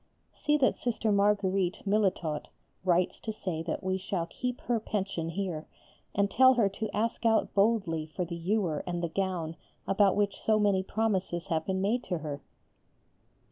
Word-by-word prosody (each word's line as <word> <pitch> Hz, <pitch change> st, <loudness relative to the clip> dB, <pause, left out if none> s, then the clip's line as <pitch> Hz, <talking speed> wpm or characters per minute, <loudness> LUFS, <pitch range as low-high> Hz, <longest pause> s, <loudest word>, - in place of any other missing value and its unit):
See 300 Hz, 0 st, +1 dB
that 270 Hz, -3 st, +3 dB
Sister 225 Hz, -2 st, 0 dB
Marguerite 200 Hz, -2 st, +2 dB
(Milletot) 190 Hz, -7 st, 0 dB, 0.4 s
writes 180 Hz, -1 st, +2 dB
to 220 Hz, -, -4 dB
say 185 Hz, -6 st, -4 dB
that 165 Hz, +3 st, -3 dB
we 190 Hz, 0 st, 0 dB
shall 185 Hz, -2 st, -2 dB
keep 250 Hz, +8 st, -4 dB
her 240 Hz, -2 st, 0 dB
pension 195 Hz, -6 st, -2 dB
here, 170 Hz, -3 st, -3 dB, 0.5 s
and 200 Hz, 0 st, +2 dB
tell 260 Hz, +3 st, +6 dB
her 230 Hz, -4 st, +4 dB
to 215 Hz, +3 st, -4 dB
ask 230 Hz, +3 st, -1 dB
out 225 Hz, -1 st, +2 dB
boldly 195 Hz, -7 st, +2 dB
for 175 Hz, +3 st, -3 dB
the 170 Hz, 0 st, -5 dB
ewer 175 Hz, -2 st, 0 dB
and 175 Hz, -1 st, -2 dB
the 170 Hz, -, 0 dB
gown 175 Hz, -3 st, -2 dB, 0.3 s
about 195 Hz, 0 st, +4 dB
which 205 Hz, -1 st, 0 dB
so 215 Hz, -1 st, +3 dB
many 200 Hz, -3 st, +3 dB
promises 190 Hz, -4 st, -1 dB
have 160 Hz, -1 st, 0 dB
been 190 Hz, -1 st, 0 dB
made 225 Hz, +6 st, +1 dB
to 180 Hz, -, -1 dB
her. 145 Hz, -3 st, -5 dB
195 Hz, 170 wpm, -30 LUFS, 175-215 Hz, 0.5 s, tell